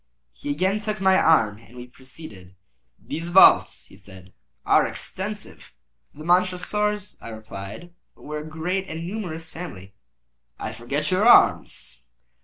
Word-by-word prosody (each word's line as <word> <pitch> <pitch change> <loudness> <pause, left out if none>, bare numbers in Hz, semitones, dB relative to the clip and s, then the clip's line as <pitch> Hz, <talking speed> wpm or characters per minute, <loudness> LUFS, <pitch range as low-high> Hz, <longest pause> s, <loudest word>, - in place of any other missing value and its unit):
He - - -8
again 185 +8 0
took 215 0 -4
my 190 0 +4
arm, 115 - +3
and 115 +2 -17
we 125 - -8
proceeded. 125 - -12 0.4
"These 165 +2 -5
vaults," 190 +2 +6
he - - -16
said, 95 -1 -14 0.3
"are - - +5
extensive." - - -7 0.4
"The 155 - -10
Montresors," 185 +3 0
I - - -10
replied, 110 - -9 0.2
"were 150 0 -7
a - - -7
great 175 +5 -3
and 160 +1 -5
numerous 170 -5 -5
family." 100 - -9 0.6
"I - - -5
forget 145 +7 -2
your 195 +5 +3
arms." 65 - +3
155 Hz, 135 wpm, -24 LUFS, 110-185 Hz, 0.6 s, vaults